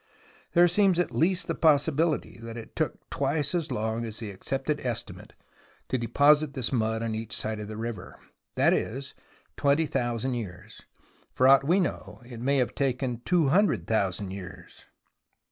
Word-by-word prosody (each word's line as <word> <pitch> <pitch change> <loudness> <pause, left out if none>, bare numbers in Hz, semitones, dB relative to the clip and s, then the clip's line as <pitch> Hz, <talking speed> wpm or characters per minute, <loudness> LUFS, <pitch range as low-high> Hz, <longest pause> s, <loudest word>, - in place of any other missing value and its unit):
There 175 0 +6
seems 190 0 +3
at 175 - 0
least 175 +1 +2
the 165 - -2
possibiHty 155 -2 +2
that 115 0 -7
it 115 - -10
took - - -3
twice 145 +2 0
as 170 -3 -1
long 110 +2 -2
as 110 -2 -6
the 110 -3 -6
accepted 135 +9 -2
estimate 120 -3 -5 0.6
to 130 - +1
deposit 145 +4 +3
the 130 -3 0
mud 110 0 0
on 115 -1 -2
each 110 0 -4
side 110 0 -3
of 105 - -6
the 110 0 -7
river, 115 -1 -6 0.4
that - - +4
is 135 +4 -3 0.4
twenty 145 +3 +2
thousand 125 -2 -1
years. 95 -7 -7 0.5
For 130 - +3
aught 135 0 +7
we 175 +6 +3
know, 180 - -3
it 120 -2 -9
may 140 +3 +2
have 125 -2 0
taken 130 -3 -1
two 170 -6 +3
hundred 155 - +2
thousand 100 -2 -1
years. 95 -2 -10
130 Hz, 165 wpm, -27 LUFS, 110-150 Hz, 0.6 s, aught